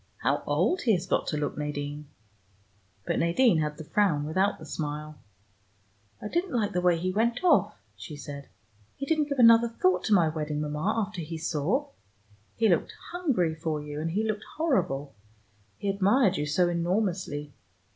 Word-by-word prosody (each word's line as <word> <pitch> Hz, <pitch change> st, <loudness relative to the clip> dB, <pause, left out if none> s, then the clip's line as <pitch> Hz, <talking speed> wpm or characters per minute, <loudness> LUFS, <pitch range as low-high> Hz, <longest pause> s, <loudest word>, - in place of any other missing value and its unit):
How -, -, +1 dB
old 365 Hz, -, +1 dB
he 230 Hz, -, +3 dB
has 180 Hz, -1 st, 0 dB
got 185 Hz, -, 0 dB
to 150 Hz, -, -1 dB
look, 145 Hz, -1 st, -2 dB
Nadine." 145 Hz, 0 st, -4 dB, 1.0 s
But -, -, 0 dB
Nadine 170 Hz, +2 st, +3 dB
had 150 Hz, -1 st, -2 dB
the 160 Hz, -, -7 dB
frown 165 Hz, -3 st, +1 dB
without 190 Hz, +6 st, +1 dB
the 160 Hz, -, -11 dB
smile. 150 Hz, 0 st, -5 dB, 1.0 s
"I -, -, -5 dB
didn't 345 Hz, -, -1 dB
like 215 Hz, -3 st, +1 dB
the 180 Hz, -, 0 dB
way 180 Hz, -1 st, +3 dB
he 185 Hz, +3 st, -1 dB
went 230 Hz, -, 0 dB
off," 360 Hz, -, +4 dB, 0.2 s
she 155 Hz, -, -9 dB
said. 145 Hz, -1 st, -8 dB, 0.5 s
"He 275 Hz, -, -5 dB
didn't 310 Hz, 0 st, +1 dB
give 280 Hz, -, -2 dB
another 230 Hz, -1 st, +7 dB
thought 185 Hz, -5 st, +1 dB
to 215 Hz, -, +2 dB
my 170 Hz, -4 st, +4 dB
wedding, 155 Hz, -1 st, -3 dB
Mama, 150 Hz, +9 st, -1 dB
after 195 Hz, -3 st, -7 dB
he 165 Hz, +1 st, -5 dB
saw. 165 Hz, -, -1 dB, 0.7 s
He 225 Hz, -, +2 dB
looked 175 Hz, -5 st, +1 dB, 0.2 s
hungry 270 Hz, -, 0 dB
for 160 Hz, -1 st, -3 dB
you, 150 Hz, 0 st, -6 dB
and 165 Hz, -, -2 dB
he 200 Hz, +6 st, 0 dB
looked 215 Hz, -1 st, -3 dB
horrible. 145 Hz, -, 0 dB, 0.6 s
He 200 Hz, -, -5 dB
admired 200 Hz, +2 st, +3 dB
you 150 Hz, -2 st, -2 dB
so 175 Hz, +5 st, +2 dB
enormously. 175 Hz, -4 st, -1 dB
175 Hz, 175 wpm, -27 LUFS, 150-220 Hz, 1.0 s, another